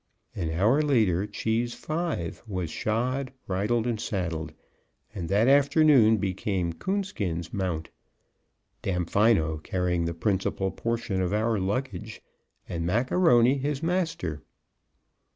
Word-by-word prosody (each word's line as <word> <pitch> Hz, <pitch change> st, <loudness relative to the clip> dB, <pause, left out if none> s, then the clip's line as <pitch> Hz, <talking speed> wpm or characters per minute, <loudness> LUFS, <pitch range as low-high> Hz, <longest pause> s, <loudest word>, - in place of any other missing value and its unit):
An 85 Hz, -4 st, -2 dB
hour 105 Hz, -, +3 dB
later 110 Hz, -, +2 dB
Cheese 115 Hz, +3 st, -1 dB
V 155 Hz, -, -2 dB, 0.2 s
was 90 Hz, -6 st, -3 dB
shod, 125 Hz, +7 st, -1 dB
bridled 105 Hz, +5 st, 0 dB
and 115 Hz, -3 st, -1 dB
saddled, 85 Hz, -7 st, -3 dB, 0.6 s
and 90 Hz, -6 st, -5 dB
that 105 Hz, +5 st, +3 dB
afternoon 140 Hz, -5 st, +5 dB
became 95 Hz, -3 st, -1 dB
Coonskin's 100 Hz, -, -3 dB
mount, 90 Hz, -5 st, -2 dB, 0.9 s
Damfino 90 Hz, -2 st, +2 dB
carrying 90 Hz, -1 st, -1 dB
the 85 Hz, 0 st, -3 dB
principal 95 Hz, +1 st, 0 dB
portion 115 Hz, -5 st, -2 dB
of 90 Hz, +1 st, -1 dB
our 110 Hz, 0 st, +1 dB
luggage, 110 Hz, +2 st, -3 dB, 0.4 s
and 85 Hz, -1 st, -3 dB
Mac 115 Hz, +9 st, 0 dB
A'Rony 135 Hz, -7 st, +4 dB
his 145 Hz, +2 st, -2 dB
master. 165 Hz, -, -1 dB
105 Hz, 115 wpm, -27 LUFS, 90-125 Hz, 0.9 s, afternoon